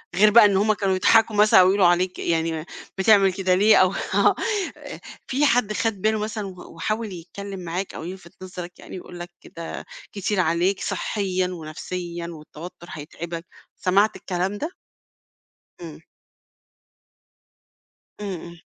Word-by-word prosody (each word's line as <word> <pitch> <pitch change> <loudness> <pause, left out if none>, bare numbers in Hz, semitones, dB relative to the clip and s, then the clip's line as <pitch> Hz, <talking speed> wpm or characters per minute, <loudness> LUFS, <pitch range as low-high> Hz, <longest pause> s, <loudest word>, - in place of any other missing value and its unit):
غير 210 +3 +6
بقى 220 +1 +8
إن 200 -2 +3
هم 215 +2 +3
كانوا 195 -2 0
بيضحكوا 220 +4 +4
مثلًا 210 -1 +6
أو 185 - +7
يقولوا 195 0 +4
عليك، 180 +1 +1
يعني 165 -1 0
م - - -11 0.3
بتعمل 195 -1 +5
كده 185 -1 +1
ليه؟ 210 +3 +6
أو 185 +1 +4 0.2
آه، - - +4 0.4
آآ - - -9 0.3
في 275 +3 +2
حد 240 -6 +2
خَد 215 -2 -1
باله 215 +1 +2
مثلًا 210 -1 -3
و 185 -3 -11
وحاول 215 +4 -2
يتكلّم 195 +3 -8
معاك 180 +2 -4
أو - - -7
يلفِت 180 0 -9
نظرك 180 -1 -8
يعني - - -10
يقول 175 -1 -9
لك 175 +1 -7
ده 165 0 -7 0.3
كتير 200 0 -2
عليك 175 +3 +1
صحّيًا 185 -3 -1
ونفسيًا 170 +1 -6
والتوتُّر 165 +2 -10
هيتعبك، 165 +3 -7 0.3
سمعت 200 +4 +2
الكلام 185 +2 -2
ده؟ 310 - -5 1.1
إمم. 165 -2 -9 2.2
إمم، 205 -1 -4
إمم. 170 +1 -11
185 Hz, 150 wpm, -23 LUFS, 175-205 Hz, 2.2 s, بقى